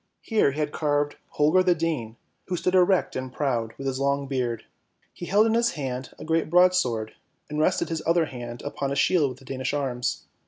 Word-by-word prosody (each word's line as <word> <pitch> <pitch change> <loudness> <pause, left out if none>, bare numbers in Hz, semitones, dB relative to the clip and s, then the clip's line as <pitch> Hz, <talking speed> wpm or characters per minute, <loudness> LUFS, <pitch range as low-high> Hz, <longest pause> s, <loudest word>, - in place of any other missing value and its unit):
Here 215 - +2
he 150 - -5
had 150 -1 -1
carved 145 -1 0 0.2
Holger 155 +5 +4
the 180 -1 +3
Dane, 150 -9 -2 0.3
who 180 - -2
stood 180 - 0
erect 185 0 +3
and 130 0 -4
proud, 120 -6 -1
with 135 - -7
his 135 -1 -1
long 140 0 +1
beard. 125 -4 -2 0.5
He 175 - -8
held 205 +3 +4
in 225 - +2
his 235 +1 +2
hand 130 -3 -4
a - - -9
great 160 0 0
broadsword, 170 -11 +3 0.4
and 150 - -2
rested 165 +4 +1
his 165 -1 -2
other 165 0 +3
hand 120 -3 -8
upon 140 -1 -3
a - - -1
shield 150 0 +3
with 125 - -8
the 135 - -17
Danish 130 +1 -3
Arms. 125 -3 -2
145 Hz, 205 wpm, -25 LUFS, 130-170 Hz, 0.5 s, Holger